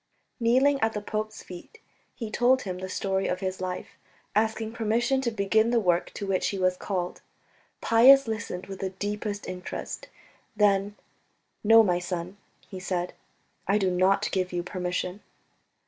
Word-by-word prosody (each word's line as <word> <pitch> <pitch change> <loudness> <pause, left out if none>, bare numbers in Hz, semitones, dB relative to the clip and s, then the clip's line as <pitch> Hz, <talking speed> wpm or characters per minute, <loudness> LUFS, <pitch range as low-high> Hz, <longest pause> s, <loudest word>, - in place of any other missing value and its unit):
Kneeling 260 +4 +3
at 220 -2 +1
the 210 - -2
pope's 215 +1 -4
feet, 180 - -11 0.4
he 225 -3 -6
told 255 +3 +3
him 185 -2 -5
the 185 0 -5
story 190 0 -1
of 180 - -1
his 190 -1 -3
life, 185 -1 -4 0.4
asking 220 +1 0
permission 235 +4 +1
to 250 - 0
begin 220 +1 +2
the 240 -1 +3
work 180 -4 +1
to 205 - -4
which 195 -1 0
he 200 - -2
was 185 -1 +2
called. 180 -2 -3 0.6
Pius 260 +4 +7
listened 205 -5 -4
with 195 0 -8
the 190 - -2
deepest 205 +2 -4
interest. 180 0 -6 0.5
Then, 205 -1 +2 0.7
"No, 225 +1 +7
my 180 -4 +1
son," 180 +1 -5 0.3
he 190 - -8
said, 180 -1 -2 0.5
"I 200 +2 +3
do 190 -3 +1
not 195 +3 +2
give 185 -1 -1
you 175 -1 -2
permission." 180 +1 -3
200 Hz, 160 wpm, -27 LUFS, 185-220 Hz, 0.7 s, Pius